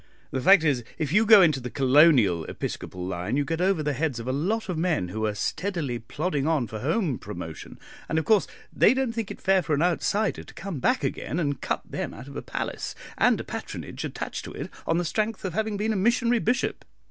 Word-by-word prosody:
The 130 Hz, -, -2 dB
fact 190 Hz, +2 st, +7 dB
is, 140 Hz, -6 st, +1 dB
if 155 Hz, -1 st, -2 dB
you 215 Hz, +2 st, +4 dB
go 215 Hz, -3 st, +9 dB
into 155 Hz, -5 st, +3 dB
the 125 Hz, -1 st, -6 dB
Colonial 130 Hz, -, +5 dB
Episcopal 90 Hz, -1 st, -5 dB
line 90 Hz, +7 st, -2 dB
you 145 Hz, -, +1 dB
get 165 Hz, +4 st, -2 dB
over 185 Hz, -4 st, +2 dB
the 150 Hz, 0 st, 0 dB
heads 140 Hz, -3 st, -1 dB
of 115 Hz, -, -7 dB
a -, -, +1 dB
lot 195 Hz, +12 st, -1 dB
of 180 Hz, -, -2 dB
men 160 Hz, -, 0 dB
who 110 Hz, +3 st, -2 dB
are 105 Hz, -, -2 dB
steadily 155 Hz, -, -2 dB
plodding 145 Hz, +4 st, -2 dB
on 155 Hz, -6 st, +2 dB
for 110 Hz, -1 st, -7 dB
home 155 Hz, -, 0 dB
promotion, -, -, -8 dB, 0.3 s
and, 160 Hz, -, 0 dB
of 160 Hz, -, 0 dB
course 215 Hz, -3 st, +4 dB, 0.3 s
they 245 Hz, -, +5 dB
don't 265 Hz, -3 st, 0 dB
think 230 Hz, -3 st, -3 dB
it -, -, -7 dB
fair 190 Hz, -1 st, +3 dB
for 155 Hz, -2 st, 0 dB
an 145 Hz, -, +1 dB
outsider 195 Hz, +4 st, 0 dB
to -, -, -14 dB
come 195 Hz, -7 st, -5 dB
back 250 Hz, -, +1 dB
again, 165 Hz, -, -2 dB
and 145 Hz, -4 st, -1 dB
cut -, -, -2 dB
them -, -, -4 dB
out 120 Hz, +5 st, -10 dB
of 140 Hz, -, -10 dB
a -, -, -3 dB
palace -, -, -4 dB, 0.2 s
and -, -, +4 dB
the -, -, -5 dB
patronage -, -, -6 dB
attached -, -, -5 dB
to -, -, -8 dB
it -, -, -6 dB, 0.2 s
on 165 Hz, -, +2 dB
the 175 Hz, -, 0 dB
strength 215 Hz, +3 st, -1 dB
of 185 Hz, -, -3 dB
having 220 Hz, +1 st, -1 dB
been 215 Hz, +2 st, 0 dB
a -, -, -2 dB
missionary 235 Hz, +4 st, +2 dB
bishop. 245 Hz, +3 st, 0 dB
160 Hz, 230 wpm, -26 LUFS, 135-200 Hz, 0.3 s, go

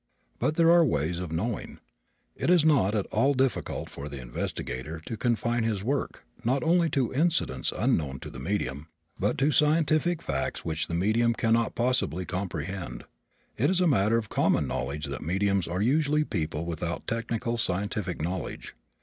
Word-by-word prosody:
But 155 Hz, -, +1 dB
there 165 Hz, 0 st, +5 dB
are 170 Hz, 0 st, +7 dB
ways 85 Hz, -, 0 dB
of 90 Hz, -3 st, -5 dB
knowing. 105 Hz, +7 st, -3 dB, 0.6 s
It -, -, -1 dB
is 175 Hz, -3 st, +5 dB
not 130 Hz, -10 st, +4 dB
at 100 Hz, -, 0 dB
all 140 Hz, +1 st, +3 dB
difficult 130 Hz, 0 st, 0 dB
for 70 Hz, +1 st, -7 dB
the 70 Hz, -1 st, -7 dB
investigator 65 Hz, +4 st, -4 dB
to 115 Hz, -, -4 dB
confine 120 Hz, +1 st, 0 dB
his 105 Hz, -4 st, -1 dB
work, 135 Hz, +5 st, -2 dB, 0.2 s
not 130 Hz, +4 st, +1 dB
only 170 Hz, +1 st, +3 dB
to 135 Hz, -5 st, 0 dB
incidents 155 Hz, -, +1 dB
unknown 65 Hz, -4 st, 0 dB
to -, -, -7 dB
the 65 Hz, -, -8 dB
medium, 75 Hz, -3 st, -2 dB, 0.3 s
but -, -, +1 dB
to 140 Hz, +3 st, +3 dB
scientific 155 Hz, +2 st, +2 dB
facts 65 Hz, 0 st, -2 dB
which 80 Hz, 0 st, -1 dB
the 85 Hz, -, -3 dB
medium 115 Hz, +6 st, +2 dB
can 115 Hz, -1 st, +2 dB
not 115 Hz, -1 st, +1 dB
possibly 120 Hz, -, 0 dB
comprehend. 90 Hz, -7 st, -4 dB, 0.5 s
It 135 Hz, +6 st, +3 dB
is 185 Hz, -1 st, +2 dB
a 180 Hz, -, +3 dB
matter 115 Hz, -, +3 dB
of 110 Hz, -2 st, -2 dB
common -, -, +2 dB
knowledge 75 Hz, +2 st, -3 dB
that 70 Hz, -2 st, -5 dB
mediums 95 Hz, +2 st, +1 dB
are 90 Hz, +4 st, -1 dB
usually 150 Hz, +4 st, +3 dB
people 80 Hz, -, -3 dB
without 85 Hz, 0 st, -4 dB
technical 115 Hz, 0 st, -2 dB
scientific 95 Hz, -4 st, -2 dB
knowledge. 90 Hz, +2 st, -4 dB
105 Hz, 170 wpm, -28 LUFS, 85-135 Hz, 0.6 s, are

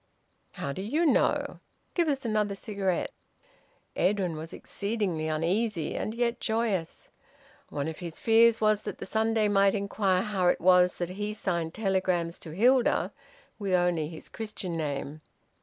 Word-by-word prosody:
"How 140 Hz, -, -3 dB
do 185 Hz, -, -5 dB
you 295 Hz, -, 0 dB
know? 300 Hz, -, +2 dB, 0.3 s
Give 345 Hz, -2 st, +2 dB
us 275 Hz, -4 st, -1 dB
another 210 Hz, -2 st, 0 dB
cigarette." 195 Hz, -3 st, -2 dB, 0.8 s
Edwin 185 Hz, -3 st, +1 dB
was 160 Hz, +1 st, -7 dB
exceedingly 200 Hz, -7 st, -2 dB
uneasy, 165 Hz, +3 st, 0 dB
and 215 Hz, -, -3 dB
yet 235 Hz, 0 st, 0 dB
joyous. 220 Hz, -7 st, -1 dB, 0.6 s
One 145 Hz, +1 st, -3 dB
of 160 Hz, -, -5 dB
his 170 Hz, -2 st, -7 dB
fears 225 Hz, 0 st, +5 dB
was 215 Hz, -1 st, +3 dB
that -, -, -6 dB
the -, -, -6 dB
Sunday 220 Hz, -1 st, +1 dB
might 200 Hz, -1 st, +4 dB
inquire 195 Hz, -2 st, +1 dB
how 195 Hz, -4 st, 0 dB
it -, -, +3 dB
was 180 Hz, 0 st, +5 dB
that 175 Hz, -1 st, -3 dB
he 205 Hz, +2 st, -4 dB
signed 170 Hz, -6 st, -2 dB
telegrams 185 Hz, -5 st, 0 dB
to 165 Hz, -, -9 dB
Hilda 240 Hz, +9 st, +3 dB, 0.5 s
with 200 Hz, -3 st, -1 dB
only 175 Hz, -3 st, +2 dB
his 160 Hz, -, -9 dB
Christian 210 Hz, -5 st, -5 dB
name. 150 Hz, -1 st, -3 dB
195 Hz, 150 wpm, -28 LUFS, 170-220 Hz, 0.8 s, fears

